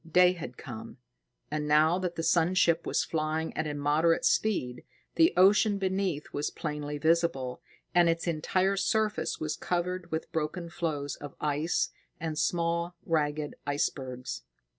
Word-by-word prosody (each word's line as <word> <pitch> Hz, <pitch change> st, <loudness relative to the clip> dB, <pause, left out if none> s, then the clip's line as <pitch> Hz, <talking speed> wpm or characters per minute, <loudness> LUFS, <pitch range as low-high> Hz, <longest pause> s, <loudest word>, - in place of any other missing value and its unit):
Day 180 Hz, +2 st, +6 dB
had 140 Hz, -8 st, -8 dB
come, 120 Hz, 0 st, -8 dB, 0.5 s
and 150 Hz, 0 st, -2 dB
now 155 Hz, +4 st, +4 dB
that 180 Hz, -2 st, -3 dB
the 165 Hz, -, -3 dB
sun 170 Hz, +2 st, +3 dB
ship 170 Hz, -2 st, +3 dB
was -, -, +1 dB
flying 160 Hz, 0 st, -2 dB
at -, -, -1 dB
a 150 Hz, -, -3 dB
moderate 155 Hz, -, +2 dB
speed, 130 Hz, -, +1 dB, 0.3 s
the 330 Hz, +2 st, +5 dB
ocean 200 Hz, +2 st, +5 dB
beneath 190 Hz, -5 st, -1 dB
was 145 Hz, -, -1 dB
plainly 150 Hz, -1 st, -4 dB
visible; 145 Hz, -5 st, +1 dB, 0.3 s
and 175 Hz, -1 st, +5 dB
its 165 Hz, 0 st, 0 dB
entire 185 Hz, +4 st, +1 dB
surface 215 Hz, +1 st, 0 dB
was 155 Hz, -1 st, -2 dB
covered 180 Hz, 0 st, -2 dB
with 160 Hz, 0 st, -4 dB
broken 165 Hz, +2 st, -3 dB
floes 150 Hz, -4 st, -3 dB
of 145 Hz, -1 st, -9 dB
ice 150 Hz, +3 st, 0 dB, 0.3 s
and 160 Hz, -2 st, -3 dB
small, 170 Hz, +1 st, 0 dB
ragged 150 Hz, -2 st, 0 dB
icebergs. 130 Hz, -, -2 dB
160 Hz, 145 wpm, -29 LUFS, 150-180 Hz, 0.5 s, Day